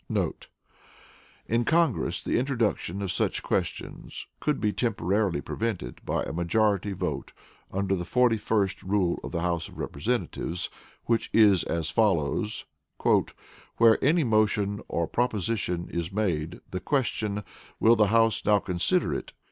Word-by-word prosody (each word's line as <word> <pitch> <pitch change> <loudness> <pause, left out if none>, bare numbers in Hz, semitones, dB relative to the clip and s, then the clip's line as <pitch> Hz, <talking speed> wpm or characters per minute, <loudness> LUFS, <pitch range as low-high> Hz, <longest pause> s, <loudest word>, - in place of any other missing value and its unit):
* - - -7
[In 115 +1 +1
Congress, 160 -1 +1
the - - +1
introduction 115 -7 -1
of 95 - -1
such - - 0
questions - - -3
could 150 -2 0
be 105 -1 0
temporarily 100 - 0
prevented 95 - -4
by - - -1
a - - -5
majority 100 +4 +1
vote - - -4 0.4
under 95 0 0
the 90 - -3
41st 110 -3 +1
Rule 95 -2 +1
of - - -6
the 85 - -2
House 85 -1 -1
of - - -14
Representatives, 90 -1 -2 0.3
which 115 -1 +1
is 105 -5 +6
as 80 -1 -1
follows: 105 +1 +1 1.1
"Where 115 -1 +5
any 160 +4 +4
motion 105 -3 +1
or 85 - -1
proposition 105 -6 -1
is 85 +1 -2
made, 90 -6 -1
the 95 - -2
question, 110 -6 -1 0.4
'Will 115 +1 +6
the 105 -2 +4
House 115 +1 +3
now 105 - +4
consider 90 -3 +1
it? - - -5
105 Hz, 135 wpm, -27 LUFS, 90-115 Hz, 1.1 s, is